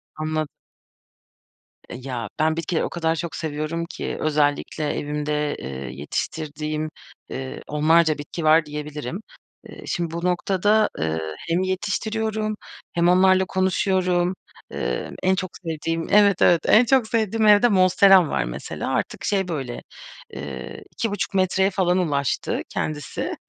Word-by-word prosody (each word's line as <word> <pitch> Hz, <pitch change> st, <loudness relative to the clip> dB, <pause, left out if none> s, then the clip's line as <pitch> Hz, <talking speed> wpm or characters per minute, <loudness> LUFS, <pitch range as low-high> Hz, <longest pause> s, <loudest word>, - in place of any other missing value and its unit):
Anlad 155 Hz, 0 st, -2 dB, 1.4 s
Eee, -, -, -6 dB
ya 120 Hz, -5 st, -4 dB
ben 160 Hz, +1 st, +2 dB
bitkileri 165 Hz, 0 st, -1 dB
o -, -, -2 dB
kadar 165 Hz, -1 st, 0 dB
çok 170 Hz, 0 st, -4 dB
seviyorum 155 Hz, +2 st, -3 dB
ki, -, -, -5 dB
özellikle 150 Hz, 0 st, 0 dB
evimde, 150 Hz, 0 st, -2 dB
eee, -, -, -6 dB, 0.3 s
yetiştirdiğim, 155 Hz, -, -3 dB, 0.4 s
eee, 130 Hz, 0 st, -6 dB
10'larca 155 Hz, +1 st, +3 dB
bitki 150 Hz, +3 st, -6 dB
var 155 Hz, 0 st, +5 dB
diyebilirim. 150 Hz, -, -5 dB, 0.5 s
Iıı, -, -, -11 dB
şimdi 170 Hz, -2 st, -2 dB
bu 170 Hz, +1 st, -3 dB
noktada, 195 Hz, +4 st, +2 dB
eee, 80 Hz, 0 st, -1 dB, 0.3 s
hem 170 Hz, +2 st, +2 dB
yetiştiriyorum 215 Hz, +3 st, -1 dB, 0.4 s
hem 170 Hz, +1 st, +3 dB
onlarla 185 Hz, +1 st, +5 dB
konuşuyorum. 185 Hz, -1 st, +1 dB, 0.4 s
Eee, -, -, -3 dB
en 190 Hz, +1 st, +3 dB
çok 185 Hz, -1 st, -3 dB
sevdiğim 165 Hz, 0 st, -3 dB
evet 200 Hz, -2 st, +5 dB
evet, 170 Hz, -3 st, +5 dB
en 235 Hz, +3 st, +6 dB
çok 255 Hz, -2 st, +3 dB
sevdiğim 220 Hz, -1 st, +1 dB
evde 210 Hz, +3 st, +7 dB
Monsteram 185 Hz, -2 st, +6 dB
var -, -, 0 dB
mesela. -, -, -5 dB
Artık -, -, -2 dB
şey 195 Hz, -2 st, +1 dB
böyle, 135 Hz, -8 st, -4 dB, 0.5 s
ııı, 65 Hz, -2 st, -7 dB
2.5 205 Hz, -4 st, -2 dB
metreye 190 Hz, 0 st, +2 dB
falan 185 Hz, -2 st, +1 dB
ulaştı 145 Hz, -7 st, 0 dB
kendisi. 150 Hz, -2 st, -3 dB
170 Hz, 130 wpm, -23 LUFS, 150-190 Hz, 1.4 s, evde